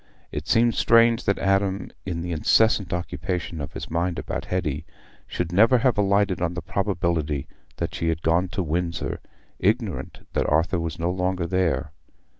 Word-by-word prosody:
It 75 +1 -5
seems 120 0 +3
strange 115 +1 +4
that 100 - +2
Adam, 95 0 0 0.2
in 85 -2 -2
the 90 - -4
incessant 100 +3 +3
occupation 90 -1 -3
of 70 +1 -6
his - - -7
mind 85 +1 0
about - - -4
Hetty, 80 -5 -2 0.4
should 90 -1 -3
never 115 +7 +5
have 125 0 +2
alighted 100 -2 +2
on 90 0 -1
the 90 - -3
probability 85 -7 -1 0.3
that - - -3
she 85 - -1
had 80 0 -2
gone 85 +3 +2
to 95 +1 -2
Windsor, 85 +1 -2 0.4
ignorant 105 -1 -1
that - - +1
Arthur 80 +4 +2
was 85 -1 -3
no 85 +1 0
longer 90 -1 -1
there. 80 -6 0
90 Hz, 165 wpm, -24 LUFS, 85-100 Hz, 0.4 s, never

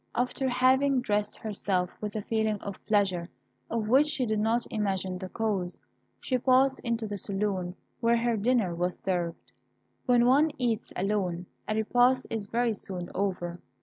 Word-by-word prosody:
After 250 +2 0
having 260 +2 +3
dressed 210 -3 -1
herself 190 -4 -1
with 210 0 -4
a 215 - -2
feeling 220 -1 0
of 200 -2 -7
pleasure 190 -5 +1 0.4
of 225 -2 -1
which 270 +6 +5
she 290 -4 0
did 215 -2 0
not 225 +3 +1
imagine 190 -4 -1
the 185 -1 -6
cause, 200 -5 -2 0.4
she 255 -2 -1
passed 265 +2 +4
into 235 -1 -2
the 205 -1 -4
saloon, 195 -3 -2 0.2
where 235 0 +3
her 235 0 +1
dinner 220 -4 +1
was 175 +1 -1
served. 175 -3 -3 0.6
When 245 -1 +5
one 280 +6 +5
eats 235 -3 -1
alone, 185 -3 -1 0.2
a 215 - 0
repast 245 +4 +3
is 220 -3 -3
very 235 +1 +1
soon 180 -3 -5
over. 180 -3 -2
215 Hz, 160 wpm, -28 LUFS, 190-245 Hz, 0.6 s, which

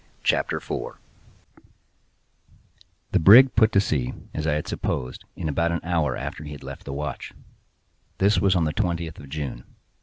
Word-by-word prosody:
CHAPTER - - +1
4 - - -6 2.1
The - - +3
brig 120 +10 +8
put 110 -1 +4
to 100 - +5
sea, 70 -10 -1 0.2
as 75 0 -3
I 75 - +2
had 75 0 -2
supposed, 65 0 -3
in - - -4
about 85 +3 0
an 85 - -1
hour 85 -3 0
after - - -6
he 75 0 -7
had 70 - -11
left - - -9
the 70 - -6
watch. 70 -1 -5 0.8
This 100 +2 +3
was 95 -1 +3
on 85 - +2
the 75 -1 -1
twentieth 85 -2 -2
of 70 - -11
June. 70 -4 -5
80 Hz, 170 wpm, -24 LUFS, 75-90 Hz, 2.1 s, brig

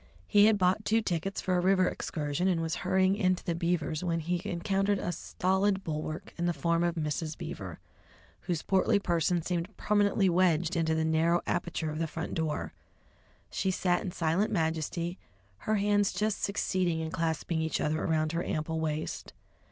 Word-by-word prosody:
He 205 -1 +5
had 220 -1 +4
bought 185 +2 +2
two 225 +1 +2
tickets 185 +1 -2
for 185 - 0
a - - +3
river 185 0 +4
excursion, 150 +3 -2
and 180 -3 +2
was 165 -1 -2
hurrying 190 +1 +3
into 185 -3 +1
the 170 - -1
Beavers' 170 -2 -1
when 170 -2 0
he 175 +2 -1
encountered 195 +3 +1
a 175 - -2
stolid 190 +2 0
bulwark 155 0 -4
in 175 - +1
the 175 - 0
form 170 +4 +1
of 175 0 0
Mrs. 155 0 -2
Beaver, - - -6 0.6
whose 170 -3 -3
portly 190 +1 +3
person 170 -3 +1
seemed 175 +3 -3
permanently 205 -1 +2
wedged 175 -1 +2
into 160 -1 +1
the 160 0 +1
narrow 160 +2 +2
aperture 160 -2 -2
of 155 - -5
the 165 - 0
front 165 +2 -5
door. 160 -2 -2 0.8
She 190 - 0
sat 180 -1 +1
in - - -3
silent 175 +6 0
majesty, 165 0 -1 0.5
her 215 - +4
hands 205 -1 +2
just 215 -1 -1
succeeding 185 -4 0
in 160 0 -3
clasping 165 0 -1
each 160 -1 -1
other 155 +1 0
around 155 -1 +1
her 170 +1 -1
ample 160 +1 -2
waist. 155 -1 -3
175 Hz, 175 wpm, -30 LUFS, 160-190 Hz, 0.8 s, He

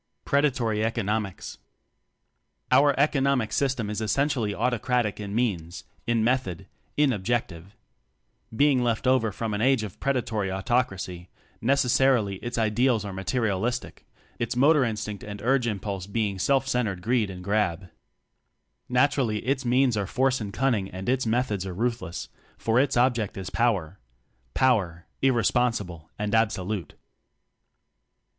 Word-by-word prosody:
Predatory 125 -7 +1
Economics. 105 - -2 1.1
Our 140 -1 +5
"economic 140 -5 +2
system" 130 -5 0
is 105 +1 -3
essen 140 +7 +1
tially 115 -8 -1
autocratic 120 0 0
in 100 0 -5
means, 90 -8 -2 0.2
in 115 -2 +2
method, 115 -8 0 0.3
in 145 -3 +4
objective. 100 -3 -3 0.8
Being 140 0 +4
a - - 0
left 115 0 0
over 125 -4 +3
from 110 +1 -3
an 105 - -2
Age 130 -2 +3
of 105 -4 -8
Predatory 115 -7 -1
Autocracy, 95 -4 -2 0.3
necessarily 125 -5 +2
its 120 +4 -5
ideals 115 0 +2
are 100 - -5
materialis 110 +4 -1
tic - - -15 0.3
its 115 0 -2
motor 145 +3 +5
instinct 110 -3 -3
and 105 -1 -7
urge 125 0 +2
im 105 -3 -2
pulse 95 -2 -5
being 100 -2 -2
self 135 +4 +2
centered 105 -9 -1
"greed 115 -2 +1
and 90 -1 -8
grab." 100 -3 0 1.0
Naturally 125 -4 +1
its 130 0 0
means 125 0 +3
are 100 -2 -1
force 130 +2 +1
and 100 -2 -4
cunning 115 -6 0
and 95 +4 -5
its 130 -2 +1
methods 110 -4 0
are 95 -2 -6
ruthless, 115 -5 -3 0.3
for 115 +2 +1
its 135 -2 +1
object 120 -5 +1
is 95 -1 -6
power 100 -7 0 0.6
power, 95 -10 +1 0.2
irresponsible 115 -9 +1
and 105 0 -2
absolute. 110 -4 0
115 Hz, 135 wpm, -26 LUFS, 100-125 Hz, 1.1 s, Our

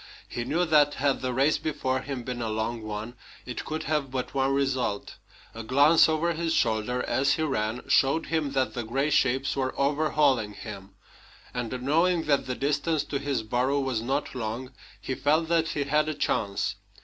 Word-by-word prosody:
He 120 - -4
knew 165 +7 +1
that, 150 -3 +4
had 140 0 0
the 130 0 -1
race 135 +5 +2
before 130 -4 -1
him 130 -2 -5
been 125 0 -4
a 115 - -2
long 110 +2 -2
one, 110 +2 -5 0.3
it 125 - -5
could 155 0 -4
have 150 -3 -1
but 130 -1 -4
one 135 0 +1
result. 130 -6 -1 0.4
A 115 - -6
glance 140 +8 +5
over 165 +2 +1
his 165 0 -1
shoulder, 110 +3 +1
as 135 +1 +2
he 160 - -1
ran, 115 -5 -2
showed 140 +4 +3
him 155 -4 -1
that 130 -1 0
the 120 - -3
gray 135 +7 -1
shapes 135 -1 +2
were 130 -1 -2
overhauling 140 -6 +2
him; 100 -3 -9 0.6
and, 125 +1 -4
knowing 165 +5 +2
that 145 -4 +1
the 125 - -2
distance 145 +3 0
to 140 - -3
his 140 -4 -2
burrow 125 +5 +1
was 130 -5 -1
not 135 +5 -2
long, 125 +1 -4 0.3
he 130 - -4
felt 155 +5 +1
that 165 -1 +2
he 145 -3 -1
had 150 +2 +1
a 155 - -3
chance. 100 -2 -1
135 Hz, 185 wpm, -27 LUFS, 120-150 Hz, 0.6 s, glance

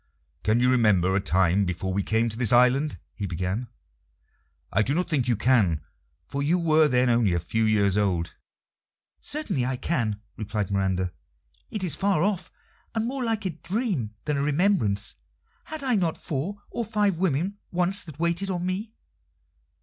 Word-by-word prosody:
"Can 110 +3 +2
you 125 +1 +4
remember 100 -7 +3
a - - +3
time 95 0 +2
before 95 +1 -2
we 100 - +1
came 110 +3 +1
to 110 - -5
this 115 -2 +1
island?" 125 +5 +4 0.2
he 100 - -4
began. 95 +7 -2 1.1
"I - - +4
do 135 +7 +1
not 180 +2 0
think 145 -7 0
you 120 - +3
can, 105 - +2 0.4
for 140 - -3
you 155 +5 +2
were 160 -2 +4
then 125 -1 +2
only 115 -6 +3
a 85 - +1
few 110 +7 0
years 100 -2 +3
old." 90 -5 0 0.9
"Certainly 225 - -1
I 130 +1 -1
can," 115 -9 -1 0.2
replied 105 -2 -3
Miranda. 95 -2 0 0.6
"It 210 -3 -4
is 165 -6 0
far 195 -2 +1
off, 190 -4 -1 0.4
and 225 0 0
more 260 +2 -2
like 225 -3 -1
a 185 - 0
dream 165 - -2
than 150 -1 0
a - - 0
remembrance. 145 - +1 0.5
Had 315 -2 -6
I 260 -2 +1
not 175 -7 +1
four 185 +9 -4
or 235 - -2
five 205 -5 0
women 185 +3 0
once 180 +3 +2
that 155 -4 -10
waited 170 +4 0
on 180 -2 -2
me?" 200 +4 -3
135 Hz, 170 wpm, -26 LUFS, -, 1.1 s, you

